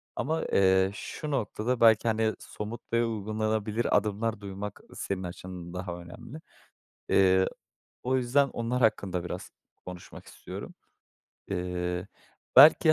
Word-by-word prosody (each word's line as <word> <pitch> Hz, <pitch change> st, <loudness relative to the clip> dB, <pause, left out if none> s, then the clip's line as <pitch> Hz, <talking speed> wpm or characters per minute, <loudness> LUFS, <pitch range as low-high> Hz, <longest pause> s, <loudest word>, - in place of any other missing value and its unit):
ama, 160 Hz, +3 st, -1 dB
eee, 95 Hz, 0 st, +4 dB
şu 150 Hz, +9 st, -6 dB
noktada 120 Hz, -1 st, -1 dB
belki 110 Hz, 0 st, +6 dB
hani, 110 Hz, 0 st, +1 dB
somut 110 Hz, +3 st, -7 dB
ve 115 Hz, 0 st, +3 dB
uygulanabilir 110 Hz, 0 st, 0 dB
adımlar 105 Hz, +1 st, -1 dB
duymak 100 Hz, +1 st, -6 dB
senin 95 Hz, -1 st, -3 dB
açından 90 Hz, 0 st, -7 dB
daha 90 Hz, -1 st, -4 dB
önemli. 115 Hz, -, -10 dB, 0.7 s
Eee, 95 Hz, -1 st, +5 dB, 0.6 s
o 130 Hz, +1 st, +2 dB
yüzden 135 Hz, +3 st, +3 dB
onlar 120 Hz, +2 st, -2 dB
hakkında 95 Hz, -5 st, +1 dB
biraz 90 Hz, -, -6 dB, 0.4 s
konuşmak 90 Hz, -1 st, -10 dB
istiyorum. -, -, -9 dB, 0.7 s
Eee, 90 Hz, -1 st, -2 dB, 0.5 s
belki 155 Hz, +3 st, +9 dB
105 Hz, 115 wpm, -28 LUFS, 95-115 Hz, 0.7 s, belki